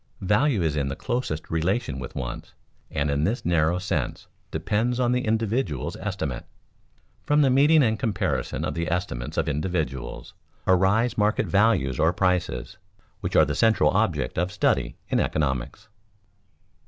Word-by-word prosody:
Value 105 - +2
is 80 -2 0
in 70 -2 0
the 70 - -3
closest 120 -8 -3
relation 80 - -1
with - - -7
wants, 60 -2 -6 0.3
and 75 -1 -1
in 70 +1 0
this 110 +9 -1
narrow 85 0 +2
sense 80 -8 -2 0.2
depends 120 +4 -1
on 120 -1 +2
the 125 0 0
individual's 110 - -1
estimate. - - -4 0.8
From 150 0 +3
the 135 - +4
meeting 145 +4 +5
and 110 -2 +1
comparison 100 - -1
of - - -2
the 85 0 -2
estimates 85 -9 -3
of 80 - +1
individuals, 75 -3 -3 0.3
arise 95 +6 +3
market 105 +1 +2
values 100 - +2
or 80 +2 +3
prices, 90 +2 -1 0.4
which 95 -1 -4
are - - +7
the - - -2
central 110 -1 +3
object 85 -9 0
of 90 +2 0
study 105 - 0
in - - +2
economics. 65 -5 -2
95 Hz, 150 wpm, -25 LUFS, 75-110 Hz, 0.8 s, are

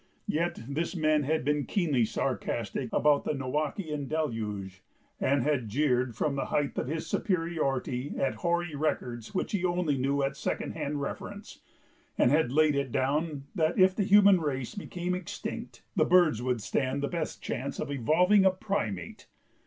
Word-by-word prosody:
Yet 165 -6 -1
this 160 +6 -2
man 155 -2 +3
had 155 -1 0
been 150 0 +1
keenly 150 - +2
sarcastic - - -2
about 150 -1 +3
the - - -1
Noachian 150 +2 -2
deluge 105 -11 -3 0.4
and 140 -1 +2
had 140 -7 0
jeered 125 -1 +1
from 145 +5 0
the 135 - -1
height 145 -2 -1
of - - -2
his 160 +3 -3
superiority 150 -7 -1
at 135 - +1
hoary 175 -1 -1
records 125 - -2
which - - -1
he 205 - 0
knew 185 - +2
only 140 -5 0
at 135 0 -3
second 145 - -3
hand 145 0 -3
reference, 140 - -6 0.6
and 120 - +4
had 150 -4 +3
laid 155 +1 +4
it 140 -3 -1
down 145 +3 0
that 160 -3 +1
if 185 0 +5
the - - 0
human 200 -2 +6
race 135 -5 -2
became 180 -3 -4
extinct 180 -2 -6
the - - +4
birds 175 -10 +4
would 125 -2 -1
stand 135 +4 -1
the - - +1
best 165 -1 -4
chance 140 +3 -4
of - - -3
"evolving 180 - +4
a 190 - +7
primate"! 185 - -3
150 Hz, 165 wpm, -29 LUFS, 130-170 Hz, 0.6 s, a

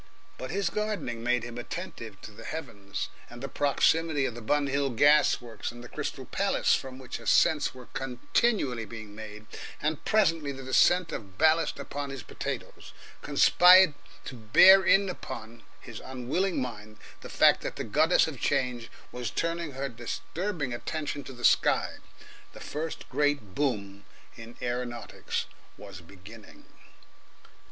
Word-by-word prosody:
But 130 - -5
his 190 0 -1
gardening 210 - -3
made 125 -1 +1
him 120 0 -7
attentive 115 - -7
to - - -10
the 110 +2 -13
heavens, 100 -11 -6 0.2
and 120 - -11
the 135 - -5
proximity 145 +2 +2
of 120 - -2
the 120 - -9
Bun 145 +6 +1
Hill 140 0 0
gas 145 +5 +4
works 120 -2 -6
and 120 0 -11
the - - -9
Crystal - - -5
Palace, - - +1
from 130 -1 -2
which 130 -2 -7
ascents 150 -4 +2
were 125 -1 -11
continually 135 - -1
being 110 -1 -9
made, 105 0 -9 0.3
and 150 +1 -2
presently 165 -9 +2
the 135 -1 -8
descent 165 +7 +3
of 95 -3 -7
ballast 160 +4 +3
upon 145 0 -5
his 135 -4 -7
potatoes, - - -6 0.3
conspired 180 -2 +6 0.3
to - - -6
bear 180 - +7
in 195 +1 +4
upon 115 -10 -7 0.2
his 120 -4 -10
unwilling 130 +9 -2
mind 110 -4 -6 0.2
the - - -9
fact - - +4
that - - -5
the - - -4
Goddess - - +3
of - - -7
Change 125 -2 -1 0.2
was 125 -3 -4
turning 165 +1 -2
her 135 +1 -3
disturbing 140 - -4
attention 145 +3 -4
to - - -8
the 120 -1 -4
sky. - - +3 0.6
The - - -11
first 155 +2 -5
great 145 -9 0
boom 100 -8 -2 0.3
in 115 0 -12
aeronautics 120 -1 -3 0.3
was - - -10
beginning. 95 +5 -15
130 Hz, 150 wpm, -28 LUFS, 115-155 Hz, 0.6 s, bear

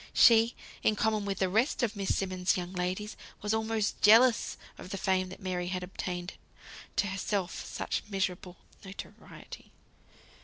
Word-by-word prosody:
She, 230 0 +6 0.3
in 215 - +3
common 215 -2 +1
with 195 -1 -2
the 190 - +2
rest 225 +8 +1
of 225 -2 0
Miss 195 -1 0
Simmonds' 185 -1 0
young 180 0 -5
ladies, 185 +4 -3 0.3
was 210 +1 0
almost 220 -1 -1
jealous 225 +3 +6 0.2
of - - -9
the 195 - -4
fame 185 -1 +1
that 185 - -10
Mary 180 -2 -3
had 180 0 -3
obtained; 180 -1 -5 0.6
to - - +2
herself, 195 -2 -2
such - - -3
miserable 185 -2 -2 0.3
notoriety. 195 0 -11
195 Hz, 150 wpm, -30 LUFS, 185-215 Hz, 0.6 s, She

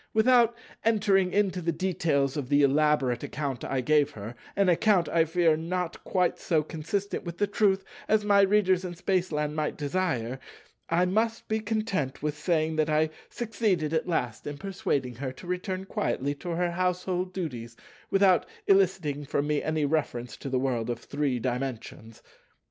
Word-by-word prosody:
Without 235 0 +4 0.3
entering 200 -4 +3
into 190 -3 +1
the 170 0 0
details 160 -6 0
of 140 -4 -4
the 145 0 +4
elaborate 140 -3 +2
account 140 -4 -4
I 135 -1 -1
gave 145 +2 +3
her,—an 120 - -3
account, 180 +1 +3
I 165 -1 +3
fear, 165 0 +3
not 175 +2 -3
quite 180 -2 0
so 160 -3 +1
consistent 165 +8 -3
with 170 -1 -6
truth 195 -3 +2 0.2
as 215 -1 +2
my 200 -1 +5
Readers 190 -2 +3
in 175 -1 -5
Spaceland 170 -5 -1
might 155 -1 -2
desire,—I 145 +2 -2
must 220 +5 0
be 220 0 0
content 215 - -2
with 150 -1 -1
saying 160 0 0
that 155 0 +2
I 155 +1 +2 0.2
succeeded 205 -9 -1
at 160 - 0
last 125 -10 -2
in 145 0 -5
persuading 145 - -2
her 130 0 -3
to 130 - -13
return 185 +1 -3
quietly 145 - -1
to 145 +5 -8
her 175 +1 0
household 180 +1 -1
duties 125 -11 -5 0.3
without 195 -2 +4 0.2
eliciting 185 -7 +2
from 145 0 -1
me 150 0 0
any 155 -1 0
reference 140 -5 -1
to 135 - -6
the 130 - 0
World 125 -3 -1
of 120 - -1
Three 140 -3 -1
Dimensions. 120 -2 -5
165 Hz, 160 wpm, -28 LUFS, 145-190 Hz, 0.3 s, my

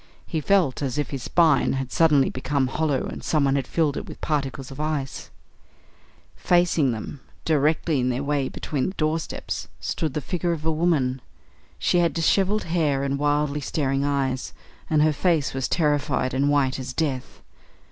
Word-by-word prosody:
He 160 -3 -2
felt 175 -6 +2
as 140 0 -2
if 150 - -2
his 135 -2 -4
spine 160 0 +3
had 135 -1 -3
suddenly 150 -4 +4
become 135 +1 0
hollow 140 0 0
and - - -7
someone 140 -3 +2
had 135 -3 -1
filled 155 -4 +1
it - - -5
with - - -10
particles 135 -3 -2
of 135 - -9
ice. 150 -3 -3 1.1
Facing 175 -6 +2
them, 115 +5 -6 0.3
directly 155 0 +2
in 125 0 +1
their 125 +2 -1
way 140 -2 0
between 140 -4 -2
the 190 - -5
doorposts, 155 0 -2
stood 155 -5 -3
the - - +1
figure 175 +4 -1
of 155 -2 -6
a 160 - +2
woman. 150 -6 +1 0.6
She 175 - +2
had 170 -1 +1
dishevelled 195 +5 +2
hair 155 -5 0
and 140 0 -1
wildly 145 0 +1
staring 135 -1 -1
eyes, 135 -3 -1 0.4
and 150 -1 +4
her 155 0 +3
face 160 -2 +1
was 135 -1 -1
terrified 145 -5 0
and 140 +2 +2
white 135 -3 +2
as 130 0 -5
death. 135 -4 -3
145 Hz, 170 wpm, -24 LUFS, 135-160 Hz, 1.1 s, suddenly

